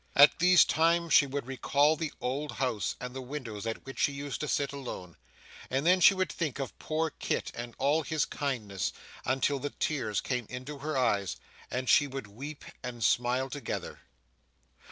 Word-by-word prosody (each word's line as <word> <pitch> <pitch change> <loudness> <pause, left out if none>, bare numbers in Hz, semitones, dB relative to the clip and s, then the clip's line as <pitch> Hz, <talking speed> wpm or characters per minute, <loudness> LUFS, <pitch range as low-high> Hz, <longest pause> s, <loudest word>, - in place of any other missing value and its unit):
At 145 +4 +7
these 180 0 +7
times, 165 0 +2
she 140 - +7
would 140 -1 -3
recall 140 +4 +2
the 155 0 -3
old 140 +4 -2
house 115 -8 -1
and 125 0 -6
the 130 - -4
window 130 -4 -6
at 115 - -6
which 135 - -8
she - - +3
used 140 0 -5
to 150 - -3
sit 140 0 0
alone; 105 -11 -7 0.5
and 135 +3 0
then 180 +2 +5
she 195 - +8
would 185 0 0
think 155 -7 -2
of 135 -3 -4
poor 160 0 -1
Kit - - -2
and 120 0 -7
all 145 +4 +2
his 155 -1 0
kindness, 110 - -2 0.3
until 135 +2 +1
the 145 - -3
tears 120 -12 -1
came 125 -4 -2
into 130 +4 -6
her 150 +1 -2
eyes, 100 -8 +1 0.3
and 125 +1 -3
she 145 - +5
would 135 -3 -5
weep 135 +9 -8 0.2
and 120 -2 -5
smile 125 +4 +2
together. 140 -5 -5
135 Hz, 180 wpm, -30 LUFS, 125-150 Hz, 0.5 s, she